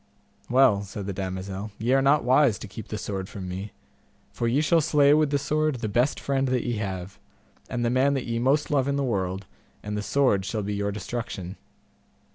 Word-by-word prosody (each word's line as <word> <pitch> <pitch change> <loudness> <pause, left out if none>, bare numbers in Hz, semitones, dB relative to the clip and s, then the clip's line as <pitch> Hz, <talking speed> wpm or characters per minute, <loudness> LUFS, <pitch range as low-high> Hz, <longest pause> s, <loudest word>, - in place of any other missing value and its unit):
Well, 125 -5 +5
said 100 0 -7
the 100 - -3
damosel, 95 +2 -4
ye 120 +4 0
are 135 - +4
not 140 +2 +4
wise 130 -2 +4
to - - -8
keep 100 +2 -9
the 105 - -4
sword 95 -3 -4
from 95 -2 -7
me, 95 +3 -5 0.6
for 115 - -2
ye 125 +5 +2
shall 165 +2 +3
slay 145 -2 +4
with 155 -1 +3
the 145 - +2
sword 155 +1 0
the 115 -3 -3
best 120 +7 +1
friend 135 -1 0
that 125 -1 0
ye 120 -2 -1
have, 95 -2 -5 0.5
and 120 -1 -1
the 120 - +1
man 135 +3 +3
that 135 - -2
ye 115 -1 -2
most 135 +6 +2
love 135 -2 +2
in 140 - 0
the 140 - 0
world, 95 -5 -2 0.4
and 105 0 -4
the 105 - -2
sword 115 -4 +2
shall 105 +2 -3
be 105 +1 -3
your 100 0 -1
destruction. 100 -2 -5
115 Hz, 215 wpm, -26 LUFS, 100-135 Hz, 0.6 s, Well